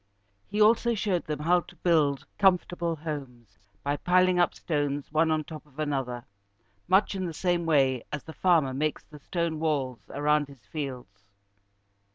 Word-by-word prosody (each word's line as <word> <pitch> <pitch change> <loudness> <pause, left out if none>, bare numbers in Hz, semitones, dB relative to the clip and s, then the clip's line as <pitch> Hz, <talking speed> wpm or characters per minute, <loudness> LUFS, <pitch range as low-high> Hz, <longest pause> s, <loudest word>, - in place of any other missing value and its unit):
He 205 +1 -3
also 230 +2 +4
showed 190 -4 -1
them 150 -1 -3
how 175 +3 +4
to 175 - -13
build 155 -5 +2
comfortable 175 -3 +2
homes 135 -8 -7 0.2
by 145 +1 0
piling 180 +1 +3
up 175 - +2
stones 145 -4 -2
one 160 +1 +3
on 155 -1 +1
top 155 0 -9
of 145 -1 -24
another, 135 -5 -2 0.6
much 190 +4 +3
in 190 -2 -2
the 165 - -6
same 175 -1 0
way 135 -5 +3
as 145 - -4
the 160 - -10
farmer 160 -8 +3
makes 150 +3 -1
the 150 -1 -14
stone 170 0 -2
walls 140 -6 -1
around 150 0 +1
his 140 -3 -16
fields. 125 -10 -6
155 Hz, 165 wpm, -28 LUFS, 140-175 Hz, 0.6 s, also